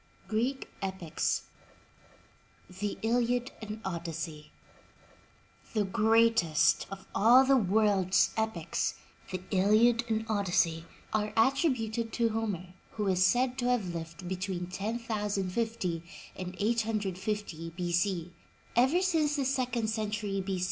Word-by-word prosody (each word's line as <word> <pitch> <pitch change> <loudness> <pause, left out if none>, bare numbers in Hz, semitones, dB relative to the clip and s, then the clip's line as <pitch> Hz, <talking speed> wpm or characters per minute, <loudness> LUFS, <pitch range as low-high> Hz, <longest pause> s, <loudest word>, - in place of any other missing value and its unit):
*GREEK 245 +5 -1
EPICS 190 -4 -1 1.4
THE 205 0 -2
ILIAD 245 +2 +1
AND 215 0 -6
ODYSSEY 165 -4 -5 1.2
HE 215 - +3
greatest 220 -5 +3
of 195 -1 -8
all 245 +5 +6
the 270 +1 +5
world's 200 -4 +3
epics 170 - -1 0.2
— - - -19
The 185 -1 -3
Iliad 215 +5 +4
and 220 0 0
Odyssey 175 -6 +1
— - - -19
are 215 -1 0
attributed 230 -3 +1
to 230 -2 +2
Homer, 205 -5 -3 0.2
who 210 -2 -2
is 185 -1 +3
said 250 +6 +2
to 245 - 0
have 210 -8 0
lived 170 +2 -7
between 185 0 -3
1050 205 -1 -2 0.3
and 185 0 -6
850 210 -5 -1
B. 175 -1 -2
C. 175 -1 0 0.4
Ever 265 +10 +4
since 315 -5 +2
the 280 -2 0
second 255 -4 0
century 210 -2 -2
B. 190 -1 -2
210 Hz, 120 wpm, -30 LUFS, 185-230 Hz, 1.4 s, all